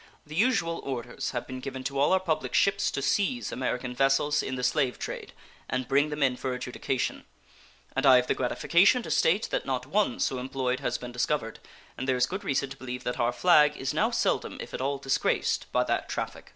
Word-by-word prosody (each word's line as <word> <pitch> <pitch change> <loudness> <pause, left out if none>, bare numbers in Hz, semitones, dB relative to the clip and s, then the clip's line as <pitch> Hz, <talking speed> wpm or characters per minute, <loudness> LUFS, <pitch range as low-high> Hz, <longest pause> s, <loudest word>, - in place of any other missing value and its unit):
The 150 - -11
usual 170 -4 +1
orders 125 -3 -4
have 120 -2 -4
been 130 0 -7
given 130 0 -6
to 135 +1 -3
all 145 - +3
our 190 - +4
public 170 -4 -2
ships 200 +1 +3
to 140 - -3
seize 210 - 0
American 125 -1 -2
vessels 135 +3 +2
in 130 - -4
the 125 - -4
slave 130 -1 +1
trade - - -6 0.4
and 130 -1 -2
bring 140 +2 +3
them 150 -1 -1
in 130 -2 +2
for 130 -1 -3
adjudication, 125 +1 -3 0.7
and - - 0
I 130 -1 +8
have 125 0 +4
the - - +1
gratification 170 - +3
to - - -6
state 195 +7 +2
that - - -2
not 130 -1 -1
one 190 - 0
so 130 - 0
employed 130 0 -2
has 125 -3 -1
been 125 0 -8
discovered, 120 -1 -1 0.4
and 130 - -3
there 130 -1 +2
is 125 - +4
good 190 +8 -5
reason 135 0 -1
to 135 - -8
believe 125 -1 -6
that 125 +1 -3
our 120 0 +2
flag 150 +1 +4
is 130 - -2
now - - +2
seldom, - - 0
if - - -8
at - - -4
all, 140 +1 0
disgraced 135 -1 0
by - - +2
that - - -1
traffic. - - -5
135 Hz, 215 wpm, -28 LUFS, 125-150 Hz, 0.7 s, I